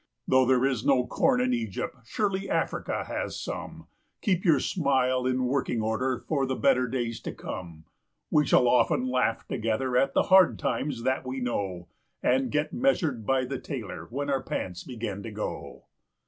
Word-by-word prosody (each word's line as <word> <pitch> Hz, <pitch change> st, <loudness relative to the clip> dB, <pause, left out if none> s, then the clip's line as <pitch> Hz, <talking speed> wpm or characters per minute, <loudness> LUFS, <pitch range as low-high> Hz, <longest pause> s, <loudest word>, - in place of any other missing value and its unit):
Though 130 Hz, -1 st, +4 dB
there 130 Hz, 0 st, +4 dB
is 130 Hz, -4 st, 0 dB
no 130 Hz, -3 st, +3 dB
corn 125 Hz, 0 st, +2 dB
in 125 Hz, 0 st, +1 dB
Egypt, 115 Hz, -2 st, -3 dB
surely 195 Hz, -, -1 dB
Africa -, -, -1 dB
has -, -, -4 dB
some -, -, -6 dB, 0.4 s
Keep 185 Hz, -5 st, +1 dB
your 160 Hz, -7 st, +4 dB
smile 130 Hz, -5 st, +1 dB
in 130 Hz, 0 st, +1 dB
working 125 Hz, -2 st, 0 dB
order 110 Hz, +4 st, 0 dB
for 140 Hz, -1 st, -1 dB
the 130 Hz, -, -1 dB
better 130 Hz, -2 st, +3 dB
days 120 Hz, -2 st, -2 dB
to -, -, -5 dB
come! 85 Hz, -3 st, -8 dB, 0.5 s
We 150 Hz, -1 st, +3 dB
shall 125 Hz, -, +5 dB
often 125 Hz, +1 st, +3 dB
laugh 125 Hz, -3 st, 0 dB
together 120 Hz, +2 st, -1 dB
at 135 Hz, +1 st, +2 dB
the -, -, +4 dB
hard 190 Hz, -2 st, +5 dB
times 125 Hz, 0 st, -2 dB
that 130 Hz, +1 st, 0 dB
we 130 Hz, +1 st, -4 dB
know, 95 Hz, -8 st, -3 dB, 0.4 s
And 130 Hz, +1 st, +2 dB
get 150 Hz, 0 st, -1 dB
measured 160 Hz, -, +1 dB
by 130 Hz, -1 st, +2 dB
the 135 Hz, +1 st, -4 dB
tailor 125 Hz, -7 st, -6 dB
when 140 Hz, +3 st, -2 dB
our 135 Hz, -1 st, +1 dB
pants 90 Hz, -7 st, -4 dB
begin 110 Hz, -6 st, -5 dB
to 115 Hz, -, -6 dB
go. 105 Hz, 0 st, -6 dB
130 Hz, 175 wpm, -27 LUFS, 115-135 Hz, 0.5 s, shall